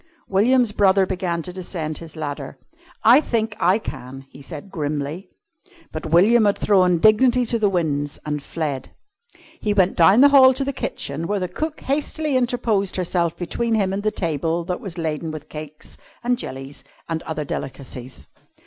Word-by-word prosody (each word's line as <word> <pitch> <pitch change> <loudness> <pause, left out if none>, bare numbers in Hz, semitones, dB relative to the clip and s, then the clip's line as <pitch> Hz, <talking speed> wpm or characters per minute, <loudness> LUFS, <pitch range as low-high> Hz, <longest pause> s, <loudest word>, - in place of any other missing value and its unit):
William's 230 +4 +3
brother 195 -2 +3
began 180 -3 -2
to 180 - -7
descend 170 -4 -5
his 165 -2 -10
ladder. 145 -3 -5 0.5
"I 245 +6 +7
think 225 -6 -1
I 185 +3 +4
can," 135 - -8
he 140 - -13
said 155 +5 -9
grimly. 150 +2 -4 0.6
But 155 +1 -5
William 210 +8 +5
had 205 - +2
thrown 185 -4 +3
dignity 240 +6 +4
to 230 0 -1
the 210 -2 +3
winds, 145 -6 -1
and 150 -1 -2
fled. 145 -4 -4 0.6
He 210 -1 -1
went 190 -1 +3
down 190 +8 +6
the 285 - +8
hall 265 -2 +7
to 275 - 0
the 280 - -2
kitchen, 160 - -4
where 195 -3 -1
cook 305 - -4
hastily 295 +1 -1
interposed 235 -6 0
herself 170 -2 -1
between 225 +6 -1
him 195 -3 +1
and 200 - -2
the 215 - +1
table 165 -3 -2
that 180 0 -3
was 185 -4 -6
laden 160 -1 -3
with 155 -1 -8
cakes 155 0 -9 0.2
and 245 +1 +2
jellies 135 - -8 0.2
and 165 -1 -3
other 155 -2 -4
delicacies. 130 -2 -7
180 Hz, 165 wpm, -22 LUFS, 155-215 Hz, 0.6 s, the